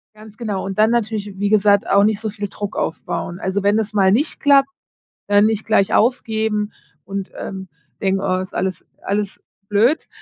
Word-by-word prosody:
Ganz 215 0 -14
genau. 210 -5 -3
Und, 195 -1 -5
dann 215 +1 +5
natürlich, 215 -4 -2
wie 200 0 0
gesagt, 205 -1 +4
auch 200 0 +4
nicht 210 0 +2
so 220 - -3
viel 205 -1 -5
Druck 205 -1 -6
aufbauen. 175 +2 -3
Also, 190 +2 -2
wenn 205 +1 +3
es 210 -1 -3
mal 190 -2 +4
nicht 285 +9 +1
klappt, 275 -1 +5 0.6
dann 205 +1 +5
nicht 220 -1 0
gleich 215 -3 +2
aufgeben 220 -3 +1 0.3
und, 195 0 -5
ähm, 190 -1 -6 0.3
denken: 195 0 +1
„Oh, 185 -1 0
ist 185 0 -6
alles 185 -1 -2 0.2
alles 200 0 -2 0.3
blöd“, 225 +9 +2
205 Hz, 180 wpm, -20 LUFS, 195-220 Hz, 0.6 s, dann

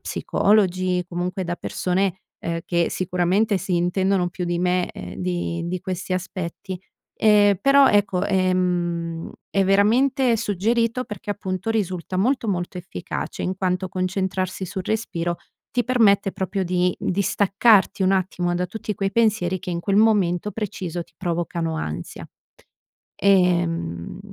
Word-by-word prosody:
psicologi, 185 -3 +1
comunque 180 +2 -3
da 175 0 -3
persone, 190 0 -1 0.3
uhm, 170 0 -1
che 170 -1 +1
sicuramente 185 +3 +1
si 185 -1 -1
intendono 180 +1 +1
più 180 +1 -5
di 175 0 -1
me, 180 0 +1
ehm, - - -8
di 175 -2 -2
di 180 +1 -3
questi 185 0 -4
aspetti. 185 0 -4 0.4
Ehm, 205 -2 +5
però 275 0 +6
ecco, 200 -3 +2
ehm, 175 -3 0 0.2
è 195 -1 +2
veramente 235 +6 +3
suggerito 230 +4 0
perché, 210 -2 -7
appunto, 195 +1 -3
risulta 185 -4 -2
molto, 245 +3 +1
molto 180 -1 -2
efficace 165 - -6
in 185 0 -2
quanto 185 0 -1
concentrarsi 185 0 -2
sul 190 +2 -4
respiro 175 -6 -2 0.4
ti 245 - +2
permette 210 -5 +3
proprio 190 +1 -2
di 180 0 +1
distaccarti 200 +1 +3
un 190 - +3
attimo 180 -2 0
da 180 - 0
tutti 210 +3 -5
quei 195 0 -1
pensieri 210 -5 +2
che 185 0 -6
in 170 - -2
quel 195 +3 0
momento 210 -3 +3
preciso 185 -5 -4
ti - - -24
provocano 170 -2 -2
ansia. 80 - -5 0.9
Ehm, 170 - +1
185 Hz, 135 wpm, -23 LUFS, 175-205 Hz, 0.9 s, però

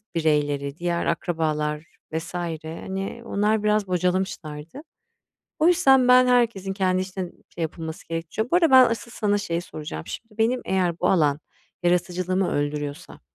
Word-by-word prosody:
bireyleri, 145 -3 0
diğer 170 0 -1
akrabalar 155 -2 -1 0.3
vs. 160 +2 -4
hani, 175 +5 -5
onlar 210 0 +1
biraz 210 -1 +2
bocalamışlardı. 180 - -2 0.8
O 315 - +3
yüzden 270 -8 +5
ben 250 0 +7
herkesin 235 -6 +2
kendi 185 -1 +1
için, 185 -1 -7
şey, 170 - -7
yapılması 160 0 -5
gerek 165 0 -4
ço 220 - -1
Bu 350 - +4
arada 335 -3 +4
ben 260 -1 +9
asıl 230 +1 -4
sana 205 -2 0
şeyi 170 -4 -2
soracağım. 150 - -7
Şimdi 225 -1 -9
benim 240 +3 +2
eğer 180 -3 0
bu 180 - +1
alan 150 -5 +3 0.4
yaratıcılığımı 180 +1 +1
öldürüyorsa 145 0 -3
180 Hz, 145 wpm, -24 LUFS, 160-210 Hz, 0.8 s, ben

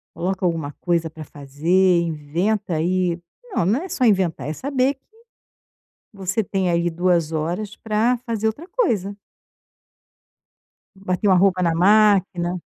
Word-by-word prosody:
Coloca 185 +2 -2
alguma 165 -4 -1
coisa 170 -2 0
para 160 0 -10
fazer, 165 +7 +1
inventa 170 +5 -2
aí, 175 +2 0 0.3
não, 280 - 0
não 210 +10 +1
é 375 - -7
só 260 - -1
inventar 185 - +1
é 150 - -2
saber 265 - 0
que 270 - -40 1.1
você 195 +2 -2
tem 190 -1 -1
aí 170 0 +1
2 170 -1 +1
horas 175 +7 -3
para 225 +3 0
fazer 225 -2 -2
outra 285 +11 -4
coisa. 210 - -1 1.8
Bater 190 +1 -2
uma 190 - +5
roupa 185 0 +3
na 170 -2 +2
máquina. 185 -2 +3
185 Hz, 135 wpm, -21 LUFS, 170-210 Hz, 1.8 s, uma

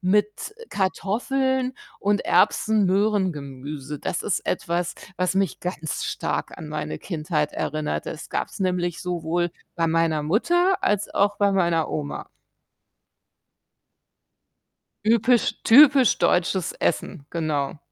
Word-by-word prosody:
mit 210 - 0 0.2
Kartoffeln 255 +7 0 0.3
und 205 +1 0
Erbsen-Möhren-Gemüse. 165 -10 +1
Das - - -3
ist 200 - 0
etwas, 170 -1 -1 0.2
was 185 +1 0
mich 195 -1 0
ganz 170 -4 -4
stark - - -3
an 155 - -8
meine 150 0 -4
Kindheit 155 -3 -2
erinnert. 150 - -3
Das - - -7
gab's - - -3
nämlich 180 -3 -1
sowohl 175 -1 -1 0.2
bei 165 -1 +1
meiner 165 -2 +1
Mutter 350 - +2
als 205 0 0
auch 205 +1 +2
bei 200 -1 +2
meiner 170 -4 +1
Oma. 145 -2 -4 2.8
Ypisch 235 +2 +3
typisch 270 0 +7
deutsches 180 0 +1
Essen, 155 -3 -2
genau. 155 -4 -2
180 Hz, 105 wpm, -24 LUFS, 155-210 Hz, 2.8 s, typisch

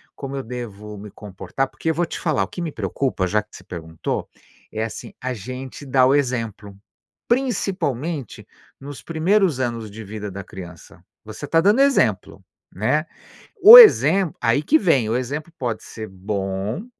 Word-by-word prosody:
Como 140 0 -7
eu 135 - -4
devo 105 -4 -8
me 105 0 -9
comportar?" 105 +6 -4
Porque 160 - -4
eu 160 - 0
vou 175 +1 +1
te - - -7
falar, 150 - 0
o - - -5
que 175 - -8
me 165 -3 -3
preocupa, 130 -11 -2
já 105 +3 +1
que 105 - -18
se - - -15
perguntou, 80 -2 -5 0.4
é 110 0 -3
assim: 115 - -7
a 130 0 -3
gente 130 +6 -8
dá 130 -1 +3
o 135 - +4
exemplo, 115 -7 -2 0.5
principalmente 175 - -2 0.3
nos 140 0 -9
primeiros 165 -2 +1
anos 115 -4 -3
de 110 +1 -9
vida 105 0 -7
da 100 +1 -7
criança, 90 -4 -12 0.2
você - - -8
tá 165 - +3
dando 210 +8 +4
exemplo, 125 - +1 0.3
né, 130 - 0 0.6
o 460 +4 +13
exemplo 190 - +6
aí 120 +4 +2
que 315 - +4
vem, 135 - +2
o 120 - +1
exemplo 150 +6 -5
pode 120 -4 -3
ser 110 -1 -8
bom, 95 - -4
125 Hz, 170 wpm, -21 LUFS, 105-155 Hz, 0.6 s, o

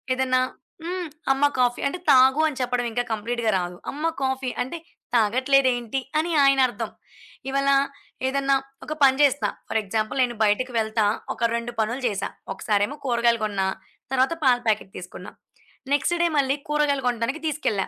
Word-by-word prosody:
ఏదన్నా 255 -1 +2 0.4
హ్మ్. 355 +1 -3 0.2
అమ్మ 270 +2 +1
కాఫీ 245 -1 +2
అంటే 280 - -3
తాగు 265 +3 +6
అని 295 -4 -4
చెప్పడం 245 -1 0
ఇంకా 245 +2 0
కంప్లీట్‌గా 230 +1 -2
రాదు. 175 0 -4 0.2
అమ్మ 300 +3 -4 0.2
కాఫీ 265 -1 -1
అంటే, 260 +7 -3 0.4
తాగట్లేదేంటి 255 +2 +2 0.2
అని 320 +3 +1
ఆయనర్థం. 270 -2 +2 0.6
ఇవ్వాళ 275 +1 +1 0.6
ఏదన్నా 275 +1 +1 0.3
ఒక 305 - -4
పని 265 -1 +6
చేస్తా 285 -1 +3 0.2
ఫర్ 225 - 0
ఎగ్జాంపుల్ 215 +4 -2
నేను 240 -1 -2
బయటికి 230 +5 +1
వెళ్తా, 220 0 +1 0.3
ఒక 235 0 0
2 235 +1 -3
పనులు 230 +5 -1
జేశా. 200 -3 -2 0.2
ఒకసారేమో 210 +5 0
కూరగాయలు 235 -2 +2
కొన్న, 205 -2 -1 0.5
తరువాత 265 +4 +2
పాల 255 -2 +5
ప్యాకెట్ 215 -3 0
తీసుకున్నా. 180 - -9 0.6
నెక్స్‌ట్ 345 +4 +1
డే - - +4
మళ్ళీ 275 -1 +2
కూరగాయలు 295 -3 +1
కొంటానికి 245 +5 -1
తీసుకెళ్ళా. 275 -10 -1
255 Hz, 150 wpm, -24 LUFS, 230-275 Hz, 0.6 s, తాగు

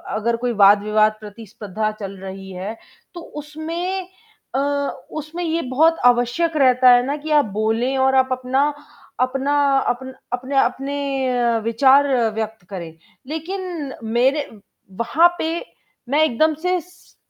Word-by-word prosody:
अगर 230 +2 0
कोई 245 -1 0
वाद-विवाद 210 +2 +5
प्रतिस्पर्धा 215 0 -5
चल 195 -1 -6
रही 190 0 -8
है 195 +5 -6 0.4
तो 345 - -8 0.2
उसमें 335 +5 -4 0.5
अ, - - +2 0.5
उसमें 310 +3 -5
ये 330 0 -1
बहुत 325 +3 +4
आवश्यक 245 +7 +2
रहता 255 -2 +5
है 245 0 +5
ना 285 +2 -2
कि 305 +1 -6
आप - - -5 0.2
बोले 230 +5 0
और 265 - +2
आप 260 0 +3
अपना 255 +3 +1 0.5
अपना 270 +3 0 0.3
अप 245 - 0 0.3
अपने 260 +3 -2
अपने 260 -3 0
विचार 265 +5 +4 0.3
व्यक्त 220 -2 -4
करें। 170 -5 -7 0.3
लेक़िन 325 -2 -5 0.2
मेरे 270 +4 +2 0.6
वहाँ 325 +8 +5
पे 320 - -1 0.6
मैं 300 +3 +3
एकदम 315 +3 +2
से 365 0 +1
स 360 +3 -22
260 Hz, 130 wpm, -21 LUFS, 225-310 Hz, 0.6 s, वाद-विवाद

